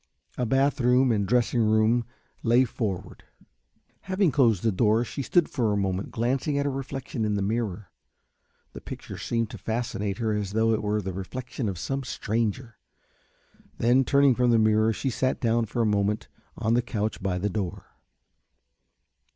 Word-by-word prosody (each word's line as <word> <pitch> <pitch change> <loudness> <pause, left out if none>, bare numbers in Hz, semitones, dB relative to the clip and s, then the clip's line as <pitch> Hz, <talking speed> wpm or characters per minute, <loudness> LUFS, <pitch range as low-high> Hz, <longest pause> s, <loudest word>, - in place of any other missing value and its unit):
A 125 - -1
bath 135 +3 +2
room 125 +1 +4
and 100 -3 0
dressing 120 0 +2
room 110 +2 +3 0.4
lay 120 +2 +4
forward. 105 -6 -4 0.8
Having 190 -2 +1
closed 115 -8 +3
the 115 - +3
door 110 +4 +2
she 140 - -5
stood 170 +4 +2
for 115 -5 0
a 105 - +1
moment 95 0 -1
glancing 130 +5 -1
at 140 - 0
her 140 - 0
reflection 135 -3 -4
in 105 -1 0
the 100 - 0
mirror. 105 -2 -2 0.8
The - - -9
picture - - -8
seemed 115 -2 -1
to - - -8
fascinate 110 -3 -3
her 110 -2 0
as 105 -2 -3
though 110 +1 +3
it 110 - 0
were 105 0 -1
the 95 0 -4
reflection 115 +4 -4
of 95 - -5
some 135 +9 -3
stranger. 115 0 -3 1.0
Then, 125 +3 +4
turning 140 0 +4
from 125 0 +2
the 115 - +5
mirror, 110 0 +3
she 130 +4 -2
sat 130 +2 0
down 115 0 +1
for 115 +3 -1
a - - +1
moment 105 0 0 0.3
on 110 0 0
the 120 - +3
couch 110 -2 -3
by 95 -2 -1
the 100 +3 -1
door. 100 -1 -4
115 Hz, 175 wpm, -26 LUFS, 105-125 Hz, 1.0 s, the